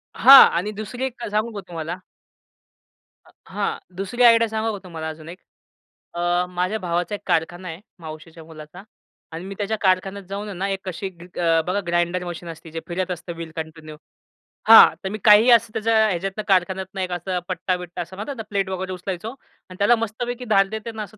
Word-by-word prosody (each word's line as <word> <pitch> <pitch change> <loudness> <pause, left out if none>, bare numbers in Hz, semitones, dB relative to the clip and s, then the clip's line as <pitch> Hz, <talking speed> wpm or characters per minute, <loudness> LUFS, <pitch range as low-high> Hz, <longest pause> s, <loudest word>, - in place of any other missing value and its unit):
हां 275 0 +10
आणि 195 +5 -2
दुसरी 215 +5 -5
एक 250 -2 -7
सांगू 215 +3 0
का 200 - -5
तुम्हाला. 170 0 -5 1.3
अ - - -21 0.2
हां, - - -2 0.2
दुसरी 220 +6 -1
आयडिया 230 -1 +6
सांगू 220 +1 -1
का 205 - -6
तुम्हाला 165 -3 -6
अजून 155 0 -10
एक. 180 - -10 0.7
अ, 175 +1 0
माझ्या 180 +4 -2
भावाचा 175 +2 -2
एक - - -10
कारखाना 175 +3 -1
आहे, 165 +2 -8 0.2
मावशीच्या 160 0 -10
मुलाचा 160 +3 -12 0.5
आणि 165 +3 -7
मी 195 +1 -7
त्याच्या 215 +1 -2
कारखान्यात 195 +1 +1
जाऊन 200 -1 -5
ना 195 +2 -2
एक 195 -1 -2
कशी 185 +2 -4
ग 175 -2 -15
ग 165 -2 +2
बघा 185 +3 0
ग्राइंडर 175 +1 0
मशीन 175 -1 -7
असती, 165 0 -10
जे 165 - -4
फिरत 180 +1 -3
असतं 175 0 -6
व्हील 165 -1 -8
कंटिन्यू 160 -1 -8 0.7
हां, 225 0 +9
तर 190 - -2
मी 215 - -4
काही 215 +3 +7
असं 230 -2 +4
त्याच्या 225 0 0
ह्याच्यातनं 195 +2 -3
कारखान्यातनं 190 0 0
एक 185 -1 -3
असा 180 +1 -3
पट्टा-बिट्टा 180 -1 -3
असं 175 +2 -8
म्हणतात 215 +8 -6
ना, 225 - -5
प्लेट 195 -2 -1
वगैरे 190 0 -4
उचलायचो 185 +3 -5 0.4
अन् 185 - -11
त्याला 205 +4 +5
मस्तपैकी 240 +2 -4
धार 195 -4 +3
देते 220 +2 -6
ना 220 -1 -5
असं 215 +1 -13
185 Hz, 190 wpm, -22 LUFS, 175-210 Hz, 1.3 s, हां